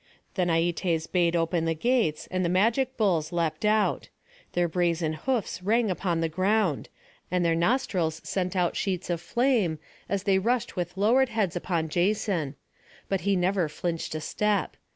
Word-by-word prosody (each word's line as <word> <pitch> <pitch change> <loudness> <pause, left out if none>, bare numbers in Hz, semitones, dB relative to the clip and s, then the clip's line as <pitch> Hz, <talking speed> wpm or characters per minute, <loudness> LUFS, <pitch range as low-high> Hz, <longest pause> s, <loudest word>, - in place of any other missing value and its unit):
Then 180 -3 0
Aietes 165 0 +1
bade 175 -1 +1
open 165 0 +1
the 165 0 0
gates, 230 -5 +1
and 185 0 0
the 170 - +1
magic 230 +8 +2
bulls 175 -8 +1
leapt 170 0 -1
out. 215 0 +1 0.4
Their 175 0 +2
brazen 170 -2 0
hoofs 220 +3 -2
rang 220 +2 +2
upon 175 -2 -1
the 165 - +1
ground, 185 0 0 0.4
and 180 0 +1
their 165 - +3
nostrils 170 -4 0
sent 185 -1 -2
out 180 -2 +1
sheets 185 -2 -2
of 170 -1 -2
flame, 235 - +1 0.3
as 200 -1 -1
they 195 -2 +3
rushed 235 +5 0
with 180 +1 -4
lowered 240 +6 +3
heads 215 -7 -1
upon 170 -2 -1
Jason; 175 -4 0 0.5
but 195 -1 0
he 200 +3 +1
never 180 -2 +1
flinched 165 0 -3
a 155 - -3
step. 210 +5 0
180 Hz, 165 wpm, -27 LUFS, 165-210 Hz, 0.5 s, their